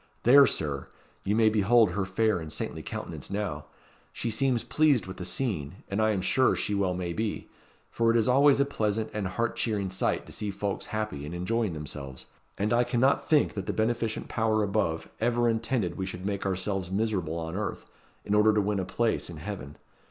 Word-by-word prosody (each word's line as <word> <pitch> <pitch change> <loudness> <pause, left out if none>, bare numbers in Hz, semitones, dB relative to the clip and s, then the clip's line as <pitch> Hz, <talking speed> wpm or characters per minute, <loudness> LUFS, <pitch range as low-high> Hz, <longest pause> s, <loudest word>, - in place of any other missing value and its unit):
There, 140 +3 +8
Sir, 70 -3 -2 0.4
you 105 - 0
may 110 0 +4
behold 110 +2 +4
her 100 -2 -1
fair 105 +1 +1
and 80 -2 -7
saintly - - -4
countenance - - -6
now. 95 -7 -3 0.5
She 115 - -3
seems 125 +1 +1
pleased 150 -8 +3
with 95 0 -8
the 90 - -5
scene, 95 - -3
and 100 +2 0
I 110 - +3
am 100 -3 0
sure 130 +7 +3
she 105 - -2
well 95 -3 +1
may 90 -1 -3
be; 110 +3 -3 0.4
for 115 -1 +2
it 115 - +4
is 115 - +2
always 140 +2 +5
a 140 - +4
pleasant 110 -5 -1
and 105 -3 -2
a - - -4
heart 115 +5 -1
cheering 100 -5 -1
sight 95 - 0
to - - -12
see 105 - -3
folks 100 0 -3
happy 110 -10 -3
and 75 +4 -6
enjoying 105 +2 -1
themselves; 70 -3 -7 0.3
and 105 +3 0
I 120 +1 +4
cannot 130 +2 +1
think 150 -2 +4
that 100 -2 -5
the - - -1
beneficent 110 0 -1
Power 110 -2 +1
above 100 -6 -1
ever 120 +1 +2
intended 115 -5 0
we 95 - -2
should 90 0 -6
make 100 -1 -2
ourselves 95 -1 -2
miserable 95 -5 -1
on 80 +1 -4
earth, 105 +1 -4 0.4
in 100 - -1
order 105 +1 +5
to 105 - +2
win 100 0 0
a 95 - -2
place 115 +1 -1
in 85 - -8
heaven. 75 -4 -7
105 Hz, 205 wpm, -28 LUFS, 95-115 Hz, 0.5 s, There